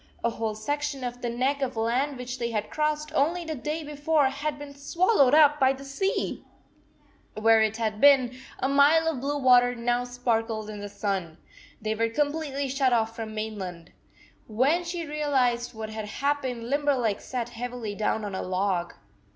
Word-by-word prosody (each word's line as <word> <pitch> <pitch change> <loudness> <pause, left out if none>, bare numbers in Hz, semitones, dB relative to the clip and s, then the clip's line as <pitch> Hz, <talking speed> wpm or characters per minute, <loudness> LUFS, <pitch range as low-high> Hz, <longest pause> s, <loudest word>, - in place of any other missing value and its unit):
A 235 - +2
whole 225 -1 -3
section 290 +4 -3
of 245 0 -5
the 240 - -2
neck 260 +4 0
of 255 -4 -2
land 250 +5 0
which 250 0 -6
they 235 -1 -1
had 215 -2 -3
crossed 305 0 -1
only 330 +4 +1
the 320 - -3
day 305 +3 -4
before 295 0 +1
had 290 +2 -3
been 290 -1 -9
swallowed 285 - +3
up 295 -1 +6
by 265 0 +4
the 275 +1 -10
sea! 385 +9 -2 0.9
Where 225 +1 +5
it 220 0 +1
had 215 -2 -2
been, 265 -3 +6 0.2
a - - 0
mile 290 +4 +5
of 305 -6 -1
blue 290 +2 -1
water 245 -2 +5
now 240 +1 0
sparkled 225 -3 -2
in 210 - -7
the 205 0 -6
sun! 195 -5 -3 0.4
They 215 0 -2
were 230 +1 0
com 290 +5 0
pletely 285 -3 -3
shut 265 -1 +1
off 225 -1 +1
from 225 -1 -5
the 215 - -9
main 215 0 -4
land. 175 -3 -7 0.6
When 270 +11 +2
she 340 -1 -4
realized 260 -6 0
what 220 0 -6
had 220 -1 -5
happened, 260 0 -2
Limberleg 270 -6 +1
sat 240 -2 -4
heavily 240 -2 -5
down 210 +1 -1
on 200 - -5
a 190 - -3
log. 185 -1 -1
250 Hz, 185 wpm, -27 LUFS, 220-290 Hz, 0.9 s, up